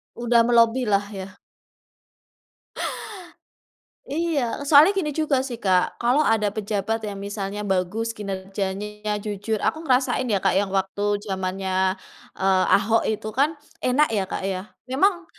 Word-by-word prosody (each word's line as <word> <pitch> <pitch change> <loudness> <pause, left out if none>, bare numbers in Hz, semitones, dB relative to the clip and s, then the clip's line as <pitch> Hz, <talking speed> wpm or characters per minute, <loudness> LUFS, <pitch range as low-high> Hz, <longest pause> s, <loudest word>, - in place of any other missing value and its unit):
Udah 235 -1 +3
melobilah, 230 -3 +3
ya? 190 -1 -8 2.7
Iya. 285 -5 -1
Soalnya 310 +7 +8
gini 360 -6 -1
juga 285 -4 +2
sih, 255 -3 -5
Kak. 185 -4 +1
Kalau 250 +5 +2
ada 210 -7 +2
pejabat 215 +1 -2
yang 200 - -6
misalnya 200 0 -4
bagus, 195 +4 -1
kinerjanya 200 +1 -4
jujur, 210 +1 -2
aku 315 +9 -1
ngerasain 255 -3 +1
ya, 200 - +3
Kak, 190 -1 +1
yang 195 +1 +1
waktu 200 +2 0
jamannya, 190 -1 -1 0.4
eee, 190 -1 +3
Ahok 220 +3 +2
itu 215 0 -3
kan. 290 +6 +1 0.2
Enak 285 +3 +3
ya, 200 -3 +1
Kak, - - -3
ya? 190 -1 -2 0.2
Memang 345 +8 +1
210 Hz, 130 wpm, -23 LUFS, 195-250 Hz, 2.7 s, Soalnya